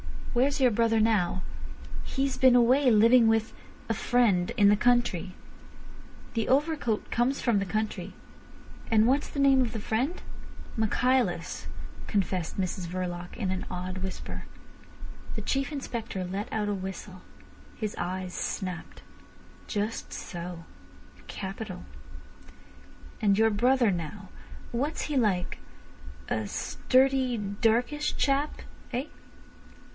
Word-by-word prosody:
"Where's 275 +4 +2
your 250 -2 +5
brother 225 0 +3
now?" 195 -5 +2 0.6
"He's 270 -1 -1
been 255 -1 +6
away 255 +3 +5
living 230 +2 +6
with—a 225 +1 -2
friend—in 205 -3 +3
the 205 - +5
country." 240 -7 +2 1.0
"The 225 -2 0
overcoat 280 -5 +1
comes 250 +4 +1
from 230 -5 +2
the 195 - -1
country. 215 +3 -3 0.8
And 220 -1 +5
what's 270 +4 +2
the 280 - -3
name 270 -1 +6
of 240 -2 -1
the 225 - -3
friend?" 250 - -1 0.6
"Michaelis," 250 +4 +1 0.4
confessed 185 -4 -1
Mrs 185 -1 -2
Verloc 175 0 -4
in 195 -5 -2
an 185 - -3
awed 185 +1 -4
whisper. 190 0 -6 0.9
The - - -3
Chief 275 +3 -1
Inspector 235 -9 -4
let 190 +3 -4
out 210 -1 -1
a - - +1
whistle. 190 -1 -6 0.5
His 215 -1 -3
eyes 185 +1 -3
snapped. 185 -2 -4 0.6
"Just 210 +1 -3
so. 175 -2 -6 0.6
Capital. 195 0 -6 1.4
And 200 -2 +4
your 225 0 +4
brother 240 +1 +3
now, 185 +3 -5 0.4
what's 280 +6 -1
he 295 -2 -1
like—a 110 - -3
sturdy, 260 - +2
darkish 225 +8 0
chap—eh?" 275 -2 -2
220 Hz, 110 wpm, -28 LUFS, 190-255 Hz, 1.4 s, been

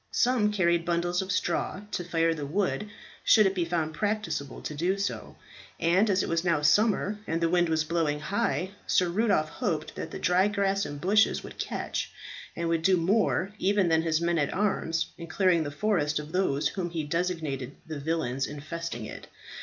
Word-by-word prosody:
Some 240 -4 +2
carried 170 -4 +2
bundles 175 +1 0
of 190 0 -4
straw, 185 +1 -1
to 180 - -2
fire 165 -1 +1
the 150 -3 -5
wood 200 +5 -1 0.3
should 215 -2 +6
it 190 - +2
be 180 -3 0
found 165 -2 -1
practicable 205 -8 -2
to - - -4
do 175 +6 0
so; 200 0 -4 0.4
and 180 +6 +3
as 190 -1 +2
it - - -3
was 165 0 0
now 165 -4 +1
summer 210 +4 +3
and 165 +1 0
the 165 -1 +1
wind 175 -1 +2
was 160 -1 +2
blowing 155 -2 0
high, 190 +2 -1 0.2
Sir 180 -1 +3
Rudolph 195 -5 +2
hoped 160 -6 -2
that - - -6
the - - -6
dry 185 +2 +3
grass 200 -1 0
and 145 - -7
bushes 205 +6 +3
would - - -11
catch, - - -3 0.5
and 170 0 -2
would 165 -1 +1
do 185 +2 +4
more 195 +2 +1
even 195 -2 +2
than 160 0 +3
his 160 -1 +1
men 170 0 +1
at 145 - 0
arms 170 -5 0
in 170 - -7
clearing 180 0 +2
the 145 - -4
forest 150 -2 0
of 150 +1 -5
those 160 -6 +1
whom 180 -3 -3
he 165 -2 -3
designated 155 -5 -2
the 155 -2 -6
villains 140 -4 -1
infesting 150 -4 -5
it. - - -9
170 Hz, 195 wpm, -28 LUFS, 160-195 Hz, 0.5 s, should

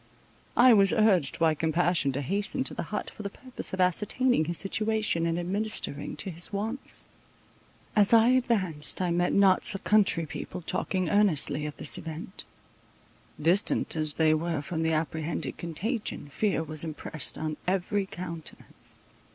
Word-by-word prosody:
I 245 0 +8
was 195 -3 +5
urged 200 -8 +2
by 165 -1 +3
compassion 160 -1 +1
to 140 +2 -3
hasten 200 - 0
to - - 0
the - - -4
hut, 210 - -4
for - - -10
the 200 - -4
purpose 255 +5 -5
of 185 - -5
ascertaining 205 +3 +2
his 170 +1 -1
situation, 215 -4 0
and 165 0 -1
administering 185 -4 -3
to 190 - -4
his 170 +1 -1
wants. 220 +6 -4 0.9
As 205 -2 +4
I 230 0 +6
advanced 210 -12 +1
I 180 -2 0
met 175 +1 +1
knots 195 0 +4
of 195 - -6
country 200 -6 +3
people 180 +4 -7
talking 185 +2 -1
earnestly 160 -6 +2
of 150 - -8
this 145 - 0
event: 165 +4 -8 0.9
distant 170 +5 +3
as 155 -2 0
they 155 0 +3
were 160 -1 -1
from 160 +2 -3
the 160 0 +1
apprehended 160 -2 -2
contagion, 170 0 -4
fear 195 +2 0
was 155 -1 -4
impressed 155 -2 -2
on 155 -1 -3
every 195 +2 0
countenance. 170 -4 -7
175 Hz, 155 wpm, -28 LUFS, 160-205 Hz, 0.9 s, I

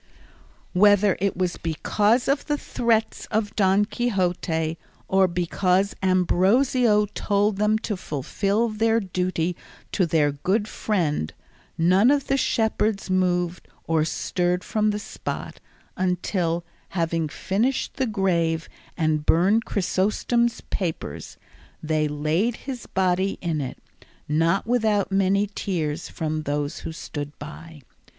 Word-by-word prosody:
Whether 205 0 +5
it 200 0 0
was 180 -1 -1
because 210 +8 +1
of 280 +1 0
the 295 -1 +1
threats 230 -5 0
of 210 -1 -1
Don 195 0 +3
Quixote, 180 -8 -1 0.3
or 190 0 +4
because 180 +2 +1
Ambrosio 210 +5 +3
told 205 0 +1
them 210 +1 +3
to 220 -1 -3
fulfil 195 - -1
their 225 +1 +2
duty 180 -3 -1 0.4
to 185 -4 +1
their 155 -3 +2
good 190 +9 0
friend, 165 - -1 0.5
none 185 +8 +4
of 280 -1 +2
the 270 - +1
shepherds 220 -5 0
moved 180 -1 0 0.2
or 160 -1 +1
stirred 180 +3 -1
from 215 -1 +1
the 210 - 0
spot 210 - -6 0.4
until, 180 -2 -1 0.3
having 165 -2 0
finished 225 - -1
the 265 - +1
grave 170 -6 0 0.3
and 155 -2 +1
burned 200 +7 +4
Chrysostom's 215 +5 0
papers, 160 - -4 0.5
they 155 -1 +1
laid 155 +10 0
his 260 -3 -6
body 190 +1 +1
in 165 -4 -1
it, 130 - -5 0.5
not 165 +5 +2
without 215 -4 +1
many 195 +1 +2
tears 165 -6 -2
from 155 -1 -3
those 145 0 -2
who - - -6
stood 145 -2 -6
by. 150 0 -10
185 Hz, 120 wpm, -24 LUFS, 165-210 Hz, 0.5 s, Whether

